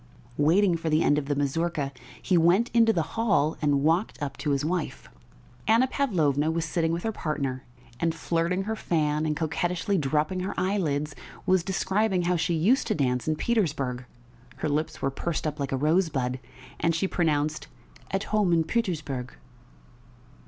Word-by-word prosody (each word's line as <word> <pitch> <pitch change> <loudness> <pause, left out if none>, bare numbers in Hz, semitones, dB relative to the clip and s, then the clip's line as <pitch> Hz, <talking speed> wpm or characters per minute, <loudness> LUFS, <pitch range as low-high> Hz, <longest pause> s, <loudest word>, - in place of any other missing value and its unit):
Waiting 170 +4 +4
for 165 0 -3
the 155 +1 +3
end 145 - +3
of 140 - -7
the 145 - 0
mazurka, 145 +1 -1 0.3
he 185 - +1
went 175 +8 +4
into 230 -1 +5
the 170 -7 0
hall 200 -10 +2
and 145 -2 +2
walked 165 +7 +1
up 145 -2 -4
to 150 - -3
his 140 0 +1
wife. 170 -1 -3 0.6
Anna 225 +4 +5
Pavlovna 160 - +1
was 165 0 -1
sitting 165 0 0
with 170 +1 -2
her 225 - 0
partner, 140 -8 -3 0.3
and, 165 -1 0
flirting 170 +3 0
her 220 +2 -2
fan 155 -5 0
and 150 -1 -1
coquettishly 175 +4 0
dropping 150 +5 0
her 185 +2 -3
eyelids, 155 -7 0 0.3
was 185 -1 +3
describing 195 0 0
how 180 +1 +1
she 170 0 0
used 210 - +2
to - - +1
dance 125 -3 0
in 155 - +2
Petersburg 145 - -1 0.5
(her 155 - -2
lips 150 +2 -2
were 135 - +1
pursed 165 +5 -3
up 150 0 -3
like 140 -1 -2
a 135 - 0
rosebud, 145 -5 +1 0.4
and 165 0 +1
she 190 +4 0
pronounced 155 -4 0 0.4
"at 195 +1 -1
home 210 -5 +1
in 165 -1 +4
Pütürsburg"). 155 - -2
165 Hz, 170 wpm, -27 LUFS, 145-185 Hz, 0.6 s, into